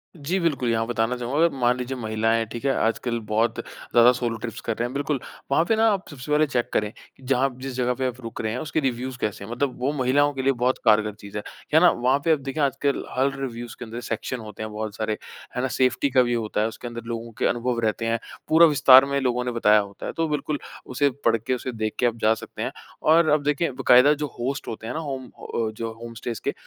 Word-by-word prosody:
जी 170 +5 -2
बिल्कुल, 150 -8 0
यहाँ 115 -1 +1
बताना 120 0 0
चाहूँगा, 125 +4 -3
अगर 170 - +4
मान 125 -1 +2
लीजिए 125 +1 -4
महिलाएँ, 110 0 0
ठीक 120 +3 -6
है, 135 - +3
आजकल 115 +1 0
बहुत 110 +2 +1
ज़्यादा 120 +1 +3
सोलो 120 -2 -2
ट्रिप्स 115 +1 -6
कर 115 - -2
रहे 120 - 0
हैं, 125 - -8
बिल्कुल। 145 0 -1 0.3
वहाँ 140 - +4
पे 225 - +4
ना 225 +1 +4
आप 195 -2 -2
सबसे 145 0 -8
पहले 150 +1 +4
चेक 125 -4 -1
करें 105 -1 +1 0.3
कि 135 - -19
जहाँ 135 +1 +2
जिस 135 -1 -5
जगह 125 0 +1
पे 130 +1 -1
आप 125 0 -5
रुक 115 -2 -6
रहे 110 - -2
हैं, 125 - -3
उसके 155 +2 -1
रिव्युज़ 130 -2 -2
कैसे 105 -1 -2
हैं? 105 - -9
मतलब 125 +2 -1
वो 130 +3 0
महिलाओं 145 +2 +2
के 135 - -3
लिए 135 +1 +3
बहुत 125 +2 +1
कारगर 105 -1 +4
चीज़ 100 0 -9
है। 105 - -4 0.3
है 160 - +8
ना? 180 +1 +7
वहाँ 130 +3 +1
पे 165 - +4
अब 155 - +3
देखें 140 +2 -3
आजकल 140 0 0
हर 135 +1 +2
रिव्युज़ 120 -3 -5
के 120 - -6
अंदर 115 +1 -6
सेक्शन 120 +2 -4
होते 110 -1 -8
हैं 110 - -5
बहुत 105 0 -5
सारे। 110 -1 -2 0.4
है 125 - 0
ना? 130 - 0
सेफ्टी 130 +2 +1
का 130 -1 +4
भी 120 0 0
होता 110 -2 -1
है, 110 - +2
उसके 115 +2 -7
अंदर 120 0 -6
लोगों 115 0 -5
के - - +1
अनुभव 120 0 -1
रहते 110 +1 -1
हैं। 115 0 0 0.3
पूरा 165 +2 +7
विस्तार 135 -3 +7
में 140 0 0
लोगों 125 -1 0
ने 125 - -1
बताया 110 -3 +4
होता 100 -1 -6
है। - - -3
तो 165 0 +1
बिल्कुल, 150 0 -2 0.3
उसे 140 +3 +1 0.2
पढ़के, 115 +2 +2
उसे 125 +1 -3
देख 110 -2 -3
के 125 - +3
आप 120 - +2
जा 110 +1 +5
सकते 115 - -8
हैं। - - -2 0.3
और 160 +1 +5
अब 150 -1 +3
देखिए, 145 +2 +1
बाकायदा 130 +2 +5
जो - - -1
होस्ट 135 +3 -3
होते 110 0 -6
हैं - - -3
ना 160 - -3
होम 135 -4 -4
अ, 115 -2 -4
जो 115 -1 -3
होम 115 0 -7
स्टेज़ 115 -1 -5
के, - - -1
125 Hz, 255 wpm, -24 LUFS, 115-140 Hz, 0.4 s, है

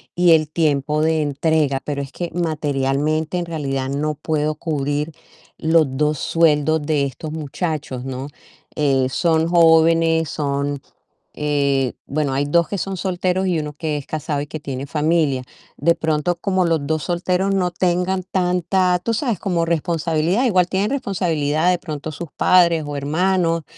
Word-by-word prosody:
y 175 -1 +4
el 155 -1 +2
tiempo 150 -1 +1
de 160 0 +2
entrega, 145 -1 +1
pero 140 -1 -2
es 135 - -7
que 175 -1 -5
materialmente, 155 0 -1
en 175 - -3
realidad 135 -5 -3
no 150 +2 -1
puedo 155 0 -1
cubrir 150 -1 -2 0.5
los 160 0 +3
2 150 0 +1
sueldos 155 -1 +2
de 145 -2 +1
estos 150 +3 -6
muchachos, 150 -4 -4
¿no? 135 +1 -5 0.5
Eh, 135 -3 +2
son 160 +2 +1
jóvenes, 165 -1 +4
son 140 -1 -2 0.6
eh, 140 -3 +1
bueno, 145 -1 -1
hay 140 +2 0
2 170 +3 +2
que 200 - -2
son 195 +1 -3
solteros, 185 0 -1
y 175 -3 +1
1 150 -1 -5
que 150 0 -3
es 145 - -7
casado 155 -1 -3
y 145 - -5
que 155 +1 -6
tiene 135 -2 -5
familia. 150 -4 +1 0.3
De 170 +4 +3
pronto, 160 +2 0
como 185 +1 0
los 160 -4 0
2 155 -1 -1
solteros 180 +2 0
no 180 -2 +1
tengan 180 +1 0
tanta, 180 0 +1
tú 230 - 0
sabes, 230 - -1
como 170 -4 0
responsabilidad, 165 - 0
igual 185 -6 +3
tienen 195 +4 0
responsabilidad, 175 - 0
de 180 - +1
pronto 155 -3 -6
sus 165 +1 -7
padres 170 -3 +4
o 145 - -4
hermanos, 165 +3 +1
160 Hz, 160 wpm, -20 LUFS, 145-175 Hz, 0.6 s, y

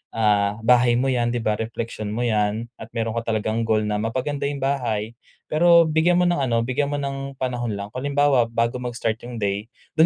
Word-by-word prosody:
ah, 105 -2 +2
bahay 120 0 +5
mo 125 - +1
yan 120 -2 +1
di - - +1
ba? 110 - +2
Repleksyon 115 -1 -4
mo 115 +4 -2
yan 105 0 0 0.2
at - - -7
meron 115 -1 -1
ka 115 - -10
talagang 110 +1 0
goal 110 -1 +2
na 105 0 -1
mapa-ganda 130 +5 -2
yung 145 - -4
bahay 120 -5 -1 0.4
pero 170 +1 +6
bigyan 160 +3 +3
mo 180 - +3
ng 175 - +1
ano, 120 -4 +1
bigyan 130 +4 -1
mo - - 0
ng 135 0 -4
panahon 120 -3 -2
lang. 100 0 -6
Kung 125 - -5
halimbawa 145 -3 +3
bago 115 +1 0
mag-start 120 -3 -2
yung 120 0 -7
day, 100 +1 -1 0.3
dun 160 - +7
120 Hz, 210 wpm, -23 LUFS, 110-140 Hz, 0.4 s, dun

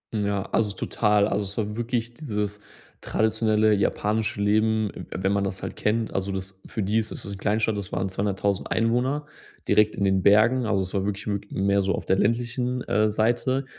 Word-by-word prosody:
Ja, 100 -2 0
also 105 -3 +1
total. 105 +1 +2
Also, 105 -1 -1
es 100 - -10
war 105 -1 -2
wirklich 120 0 -2
dieses 105 -7 -3 0.4
traditionelle 110 0 +2
japanische 105 +2 0
Leben, 110 +1 +2
w - - -8
wenn 95 +2 -1
man 100 - +1
das 95 -1 -3
halt - - -5
kennt. 110 +1 0
Also 95 +1 -1
das 95 0 -6
für 110 - -3
die 105 +4 +2
ist 110 - -3
das - - -6
'ne 100 0 -5
Kleinstadt. 105 +2 0
Das 100 -2 -5
waren 95 +1 -1
200.000 100 0 -1
Einwohner, 125 +6 +1 0.4
direkt 105 0 +4
in 100 - 0
den 95 -1 +2
Bergen, 115 +5 +5
also 100 -2 +1
es 95 - -6
war 100 -2 0
wirklich 100 +1 -3
wi 100 -1 0
mehr 100 +1 +1
so 95 0 0
auf - - -6
der 95 - +3
ländlichen, 120 +3 0
äh, 105 +1 +2
Seite. 120 +5 +1
105 Hz, 195 wpm, -25 LUFS, 100-110 Hz, 0.4 s, Bergen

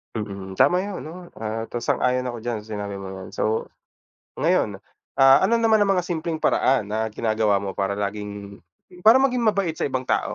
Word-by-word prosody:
Mm. 100 -3 -6
Tama 180 +2 +4
yun, 200 -2 -5
'no, 155 - -8 0.3
ah, 110 0 -3
tas 120 - -4
sang-ayon 125 0 +1
ako 120 -1 -4
diyan 120 -3 -2
sa 110 +1 -13
sinabi 100 -1 -5
mong 95 0 -7
'yan. 95 -1 -9
So, 110 +1 -2 0.6
ngayon, - - 0 0.3
ah, 135 0 +7
ano 230 - +2
naman 225 -2 +4
ang 195 -1 +3
mga 180 - +1
simpleng 165 -2 -3
paraan 125 -6 +2
na 110 +1 -1
ginagawa 110 -3 +1
mo 100 - -3
para 100 0 0
laging, 100 0 -5 0.5
para 255 +4 +8
maging 255 -2 +2
mabait 195 -6 +1
sa - - 0
ibang 130 -2 -2
tao - - -1
115 Hz, 190 wpm, -23 LUFS, 100-170 Hz, 0.6 s, para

